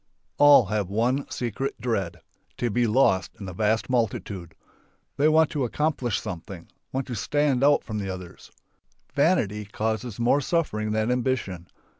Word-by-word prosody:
All 145 -5 +8
have 100 -1 -2
one 120 +7 0
secret 125 +3 -3
dread: 105 -7 -2 0.4
To 120 -2 -1
be 120 +2 +2
lost 105 -5 +2
in 100 - -7
the 90 - -6
vast 110 +4 +1
multitude. 100 -8 -2 0.6
They 145 - +4
want 160 0 +4
to 145 -3 -1
accomplish 130 -2 -1
something, 90 +1 -8 0.2
want 135 0 -2
to 125 - -6
stand 140 +3 +1
out 145 0 +4
over 110 -2 -3
the 100 -1 -4
others. 90 -2 -8 0.6
Vanity 115 - +2
causes 110 +2 -3
more 125 +5 +3
suffering 130 -10 -1
than 110 +2 0
ambition. 120 -9 -2
115 Hz, 150 wpm, -25 LUFS, 100-135 Hz, 0.6 s, All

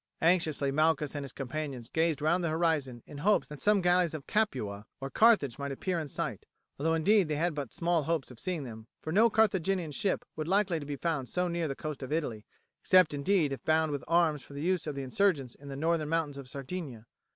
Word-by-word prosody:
Anxiously 160 -5 +2
Malchus 155 0 +2
and 145 -1 -4
his 135 - -7
companions 135 -2 -5
gazed 160 -2 0
round 170 +3 +2
the 170 - +1
horizon 155 -7 0
in 145 - -9
hopes 205 +7 +2
that 150 -1 -9
some 205 -1 +4
galleys 175 -2 +3
of 150 -2 -7
Capua 115 - -1
or 135 0 -5
Carthage 205 - +4
might 140 0 -3
appear 175 +6 -2
in 155 - -4
sight, - - -4 0.3
although 160 +3 +2
indeed 195 +3 +4
they 155 - -1
had 165 +3 0
but 140 -6 -5
small 170 -1 +1
hopes 150 -3 -2
of 120 - -13
seeing 180 -5 -2
them, 110 -3 -9 0.2
for 155 - -3
no 220 +7 +5
Carthaginian 190 -6 +1
ship 195 +6 -1
would 155 - -3
be - - -6
likely 190 -3 +2
to 145 - -8
be 145 - -3
found 150 -4 -2
so 180 0 0
near 170 -1 -1
the 135 - -3
coast 155 -1 -6
of 130 - -6
Italy, 135 -9 -2 0.3
except 185 -5 +5
indeed 145 0 +1
if 130 - -7
bound 160 -1 +2
with 140 -3 -3
arms 165 -3 +3
for 140 - -14
the 145 - -4
use 180 -2 0
of 150 - -3
the 140 - -4
insurgents 135 -3 +1
in 140 - -14
the 135 - -6
northern 155 +1 0
mountains 155 -4 -1
of 130 -2 -9
Sardinia. 140 -4 -6
155 Hz, 230 wpm, -30 LUFS, 140-175 Hz, 0.3 s, no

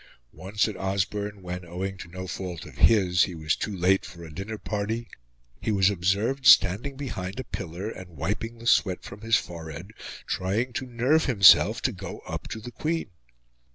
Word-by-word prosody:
Once, 100 +3 -1
at 105 - -5
Osborne, 100 +1 -2
when, 90 0 -5
owing 90 +3 -4
to 95 - -9
no 95 +2 -7
fault 90 -2 -5
of - - -11
his, 95 -5 +4
he 90 - -7
was 80 0 0
too 105 -3 -4
late 95 +2 +3
for 85 -1 -10
a 80 -1 -10
dinner 100 +6 -5
party, 110 +3 -3 0.5
he - - -2
was 100 -1 +4
observed 100 +9 0
standing 110 +7 +6
behind 120 -6 -5
a - - -3
pillar 90 -1 -6
and 95 -4 -8
wiping 115 +9 -3
the 115 - -12
sweat 95 -5 +3
from 100 - -10
his 115 0 +3
forehead, 85 +2 -5 0.3
trying 110 +7 -1
to 130 - -3
nerve 125 +7 +2
himself 100 - +6
to - - +2
go - - -7
up - - -6
to 110 - -6
the 120 +3 -8
Queen. 160 -3 -2
100 Hz, 185 wpm, -26 LUFS, 90-115 Hz, 0.5 s, standing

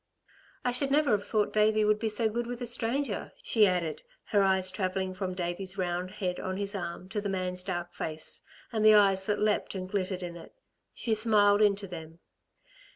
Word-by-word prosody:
"I 245 - +2
should 270 +3 +1
never 290 +1 +3
have 200 -1 +1
thought 215 -2 0
Davey 215 0 +3
would 210 0 +3
be 225 - -1
so 220 +1 +2
good 235 +2 -2
with 245 0 -5
a - - -2
stranger," 240 0 -1
she 215 -3 +4
added, 170 -4 -1 0.3
her 205 - +3
eyes 190 -1 +2
travelling 185 0 -2
from 185 -1 -4
Davey's 180 +2 -3
round 180 0 -2
head 185 -3 -3
on 185 0 -3
his 200 +1 -2
arm 180 -1 -5
to 205 +2 -2
the 205 - -3
man's 185 -1 -1
dark 175 -1 -4
face, 155 0 -3 0.3
and 220 -2 -1
the 215 0 +8
eyes 195 -2 +4
that 210 -1 +1
leapt 210 -1 0
and 185 -1 -4
glittered 185 -1 -2
in 175 -1 -6
it. 170 - -12 0.4
She 230 - -1
smiled 210 -2 +4
into 200 -1 +2
them. 165 -2 -9
200 Hz, 200 wpm, -29 LUFS, 185-215 Hz, 0.4 s, the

